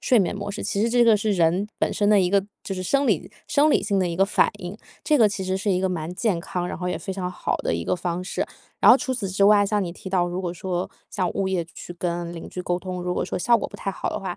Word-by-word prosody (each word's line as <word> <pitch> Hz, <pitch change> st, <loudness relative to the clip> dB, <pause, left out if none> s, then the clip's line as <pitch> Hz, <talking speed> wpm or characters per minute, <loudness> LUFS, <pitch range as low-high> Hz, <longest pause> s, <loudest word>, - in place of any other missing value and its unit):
睡 245 Hz, -, +4 dB
眠 195 Hz, +1 st, +1 dB
模 200 Hz, 0 st, -4 dB
式。 200 Hz, -, -5 dB
其 200 Hz, -, -1 dB
实 230 Hz, -, +3 dB
这 240 Hz, 0 st, +4 dB
个 230 Hz, -, +6 dB
是 210 Hz, 0 st, +1 dB
人 180 Hz, +3 st, +2 dB
本 -, -, +1 dB
身 205 Hz, -1 st, +1 dB
的 210 Hz, -1 st, +6 dB
一 180 Hz, -1 st, +2 dB
个 200 Hz, -1 st, +3 dB, 0.2 s
就 195 Hz, -, -3 dB
是 185 Hz, -, -4 dB
生 275 Hz, +8 st, +1 dB
理 200 Hz, -3 st, 0 dB, 0.2 s
生 300 Hz, +1 st, +3 dB
理 -, -, +3 dB
性 200 Hz, -2 st, 0 dB
的 180 Hz, -2 st, +1 dB
一 170 Hz, -, -3 dB
个 195 Hz, -, +4 dB
反 200 Hz, -, +3 dB
应。 180 Hz, +2 st, -6 dB, 0.3 s
这 300 Hz, -2 st, +3 dB
个 220 Hz, -2 st, +6 dB
其 195 Hz, -1 st, -4 dB
实 185 Hz, 0 st, 0 dB
是 205 Hz, 0 st, 0 dB
一 185 Hz, 0 st, +2 dB
个 -, -, +3 dB
蛮 170 Hz, -1 st, -3 dB
健 200 Hz, -2 st, 0 dB
康， 180 Hz, 0 st, -3 dB
然 -, -, -5 dB
后 180 Hz, -, -2 dB
也 -, -, -1 dB
非 190 Hz, -, -5 dB
常 180 Hz, -1 st, -3 dB
好 -, -, -2 dB
的 -, -, -1 dB
一 85 Hz, -, -3 dB
个 -, -, +1 dB
方 175 Hz, 0 st, -3 dB
式。 185 Hz, -, -2 dB, 0.3 s
然 -, -, +8 dB
后 245 Hz, -, +9 dB
除 270 Hz, -2 st, -2 dB
此 210 Hz, -6 st, -3 dB
之 195 Hz, +2 st, 0 dB
外， 205 Hz, -1 st, +6 dB
像 205 Hz, -1 st, +1 dB
你 175 Hz, -, -3 dB
提 190 Hz, +2 st, -9 dB
到， 180 Hz, -2 st, +2 dB
如 180 Hz, +1 st, -3 dB
果 180 Hz, -2 st, -3 dB
说 180 Hz, 0 st, -3 dB, 0.2 s
像 180 Hz, -2 st, -1 dB
物 195 Hz, -1 st, -1 dB
业 180 Hz, -3 st, 0 dB
去 175 Hz, -, -8 dB
跟 175 Hz, -1 st, -3 dB
邻 165 Hz, -, -8 dB
居 180 Hz, -, -6 dB
沟 175 Hz, 0 st, -1 dB
通， 180 Hz, -1 st, -5 dB
如 180 Hz, 0 st, -1 dB
果 -, -, -1 dB
说 -, -, -4 dB
效 235 Hz, +5 st, +4 dB
果 -, -, -4 dB
不 -, -, -10 dB
太 195 Hz, -, -3 dB
好 -, -, -4 dB
的 -, -, -2 dB
话， 185 Hz, -2 st, -5 dB
190 Hz, 335 characters per minute, -24 LUFS, 180-205 Hz, 0.3 s, 后